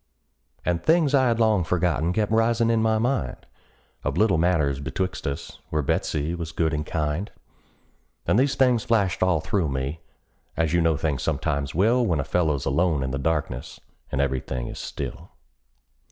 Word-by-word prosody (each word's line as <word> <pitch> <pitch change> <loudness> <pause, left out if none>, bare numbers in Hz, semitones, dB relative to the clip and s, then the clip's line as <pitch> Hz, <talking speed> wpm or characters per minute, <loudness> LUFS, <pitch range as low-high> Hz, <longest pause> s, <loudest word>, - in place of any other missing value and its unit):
And 85 -1 0
things 160 -3 +3
I 130 -2 +4
had 115 -1 +1
long 110 -5 +3
forgotten 85 -1 +1
kept 105 +2 0
risin' 115 +1 +3
in 115 -1 +2
my 110 0 +2
mind, 115 - -1 0.6
Of - - -2
little 100 -7 +3
matters 75 -6 +2
betwixt 90 +3 -3
us, 70 0 -5
where 75 -1 0
Betsey 75 +3 -1
was 85 -2 -5
good 80 -1 0
and 75 0 -1
kind; 75 +4 -2 1.0
And 105 - +3
these 135 +1 +2
things 125 -4 +3
flashed 100 -6 +1
all 90 -4 +3
through 85 -1 0
me, 65 +4 -3 0.6
as 80 -1 +1
you 85 - +3
know 80 -2 +2
things 75 -5 -1
sometimes 70 +2 -1
will 115 +8 +3
When 85 -10 +1
a - - 0
feller's 75 -4 0
alone 75 +1 +1
in 65 - -2
the 70 - -2
darkness, 75 -4 -2 0.3
and 65 - -1
every 70 -2 +1
thing - - -5
is - - -7
still. - - -6
85 Hz, 175 wpm, -25 LUFS, 75-110 Hz, 1.0 s, I